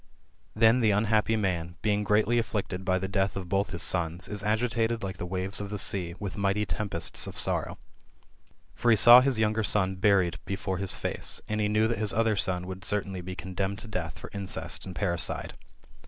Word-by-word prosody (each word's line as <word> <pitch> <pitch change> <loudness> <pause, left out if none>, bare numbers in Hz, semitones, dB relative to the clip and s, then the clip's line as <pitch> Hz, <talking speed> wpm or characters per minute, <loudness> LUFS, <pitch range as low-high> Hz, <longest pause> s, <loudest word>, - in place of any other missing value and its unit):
Then 115 +3 +4
the 110 -3 +3
unhappy 110 +2 +2
man, 85 -5 -2
being 105 -1 +1
greatly 105 +3 +2
afflicted 100 -4 -3
by 95 0 +1
the 95 +1 -3
death 95 0 -1
of 95 -2 -5
both 100 +2 0
his 85 -3 +2
sons, 85 0 +2
is 105 -2 -3
agitated 115 +1 0
like 95 -1 -5
the 90 - -5
waves 95 +2 -3
of 100 - -5
the 105 - -4
sea, 90 -3 -1
with 100 -3 -5
mighty 100 +1 0
tempests 105 +1 -2
of - - -8
sorrow. - - -1 1.0
For 120 - 0
he 115 - +5
saw 120 +4 +9
his 135 -2 +1
younger 110 0 +1
son 95 -2 0
buried 95 -3 +2
before 95 -1 -3
his 100 -1 -1
face, - - -2
and 105 0 -2
he 105 - +1
knew 105 +1 +2
that 115 -2 -2
his 105 -2 +3
other 115 0 +1
son 90 -2 -1
would 95 +1 -8
certainly 95 -2 -2
be 90 +1 -7
condemned 95 +2 -4
to 110 - -8
death 85 -8 -5
for - - -10
incest 95 -3 -1
and 90 - -8
parri 85 -4 -1
cide. - - 0
100 Hz, 205 wpm, -27 LUFS, 95-110 Hz, 1.0 s, saw